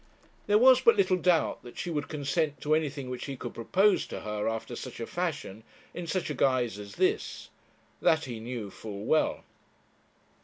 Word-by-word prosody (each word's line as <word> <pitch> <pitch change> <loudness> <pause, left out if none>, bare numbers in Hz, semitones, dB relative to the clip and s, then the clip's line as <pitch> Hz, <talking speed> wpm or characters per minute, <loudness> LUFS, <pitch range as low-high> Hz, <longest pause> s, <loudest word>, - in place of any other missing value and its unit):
There 205 0 +5
was 255 +2 +7
but 235 -3 +6
little 185 -2 +4
doubt 175 -2 +2
that 120 - -12
she 175 - -3
would 150 -3 -2
consent 150 +1 -1
to 150 - +1
anything 145 -4 -1
which 125 -1 -5
he 140 -2 -5
could 120 - -6
propose 185 - +2
to - - -6
her 105 -1 -3
after 115 +2 -4
such - - -7
a 115 - -3
fashion, 145 - -4 0.3
in 175 -1 -6
such 180 -2 -1
a - - -1
guise 125 -6 +1
as 100 -1 -9
this; - - 0 0.5
that 160 0 +3
he 120 -3 -6
knew 115 -3 -5
full 105 0 -7
well. 155 - +2
140 Hz, 185 wpm, -29 LUFS, 115-170 Hz, 0.5 s, was